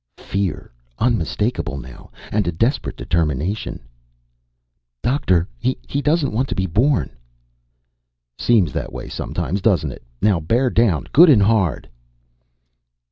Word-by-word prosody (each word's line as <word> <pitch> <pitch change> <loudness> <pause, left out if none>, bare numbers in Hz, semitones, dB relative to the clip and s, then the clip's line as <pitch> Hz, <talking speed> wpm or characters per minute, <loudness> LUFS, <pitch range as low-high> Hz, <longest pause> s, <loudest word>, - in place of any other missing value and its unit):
Fear. 95 -9 -3 0.3
Unmistakable 85 - -1
now. 65 -2 -11 0.2
And 105 -4 0
a - - +1
desperate 115 - -1
determination 85 +4 -2 1.2
"Doctor, 95 - +1
he 130 +2 -2
doesn't 150 -1 +1
want 130 +5 0
to - - -2
be 95 - 0
born!" 120 - +1 1.2
"Seems 95 - +2
that - - -4
way - - -7
sometimes, 95 +4 -3
doesn't 90 -9 +2
it? - - -11 0.2
Now 100 -4 +2
bear 120 +11 +1
down 100 - +2
good 170 +3 +8
and 115 -9 +6
hard." 100 - +1
100 Hz, 120 wpm, -20 LUFS, 85-120 Hz, 1.2 s, good